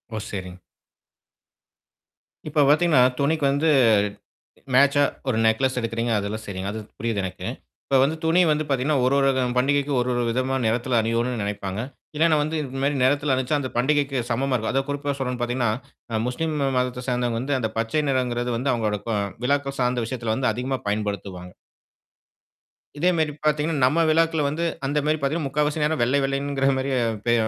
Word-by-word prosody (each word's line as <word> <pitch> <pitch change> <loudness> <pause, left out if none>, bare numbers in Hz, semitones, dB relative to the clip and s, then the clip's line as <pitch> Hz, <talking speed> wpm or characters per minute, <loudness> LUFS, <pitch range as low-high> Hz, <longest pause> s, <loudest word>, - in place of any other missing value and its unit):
ஓ! - - -2
சரிங்க. 90 -2 -6 1.9
இப்ப 150 0 +3
பார்த்தீங்கன்னா, 155 -3 +4 0.2
துணிக்கு 145 +1 +1
வந்து 145 +3 +1 1.1
மேச்சா 140 +2 +5 0.2
ஒரு 115 - +1
நேக்லஸ் 130 +4 +2
எடுக்குறீங்க. 115 0 -2
அதெல்லாம் 105 +2 -4
சரிங்க. 95 0 -4
அது 110 - -5 0.2
புரியுது 115 -2 -1
எனக்கு. 95 0 -6 0.4
இப்ப 135 - +2
வந்து 155 +4 +1
துணி 165 +2 +4
வந்து 155 0 +1
பார்த்தீங்கன்னா 135 +2 +1
ஒரு, 130 - +2
ஒரு 135 0 +4
க - - +2 0.2
பண்டிகைக்கு 140 +2 +2
ஒரு, 125 - -1
ஒரு 120 0 0
விதமான 130 +3 0
நிறத்துல 120 +1 +1
அனியோனுன்னு 115 +1 -1
நினைப்பாங்க. 100 -1 -4 0.4
இல்லன்னா 160 0 +4
வந்து 155 +2 -2
இந்தமாரி 135 +1 -2
நிறத்துல 140 +1 +2
அனிச்சா 130 +3 0
அந்தப் 130 -4 -5
பண்டிகைக்குச் 135 -2 +1
சமமா 130 +3 0
இருக்கும். 110 -3 -1
அதான் 135 +1 -1
குறிப்பா 145 0 -2
சொல்றேன் 125 -2 -2
பார்த்தீங்கன்னா, 120 -1 0 0.4
அ 110 - 0
முஸ்லிம் 155 +5 -2 0.2
மதத்தைச் 125 0 -2
சேர்ந்தவங்க 120 -2 0
வந்து 135 +2 -1
அந்தப் 110 -3 -3
பச்சை 115 +7 0
நிறம்ங்கிறது 125 -2 -1
வந்து 130 +3 0
அவுங்களோட 110 -3 -1
க 110 -2 0 0.3
விழாக்கள் 140 +1 0
சார்ந்த 125 -1 +1
விஷயத்துல 115 -3 -2
வந்து 130 -3 +1
அதிகமா 130 +3 -3
பயன்படுத்துவாங்க. 100 -3 -4 1.5
இதேமாரி 160 -2 +1
பார்த்தீங்கன்னா, 150 0 +1
நம்ம 165 +6 +3
விழாக்கள் 160 -2 +2
வந்து 155 +4 -2 0.2
அந்தமாரி 150 +2 +1
பார்த்தீங்கன்னா, 140 +2 -1
முக்காவாசி 150 +2 0
நேரம் 155 +1 0
வெள்ளை, 130 +4 +2
வெள்ளைங்கிற 135 0 0
மாதிரியே, 130 -1 0 0.3
பே 120 - +3
130 Hz, 160 wpm, -24 LUFS, 120-145 Hz, 1.9 s, மேச்சா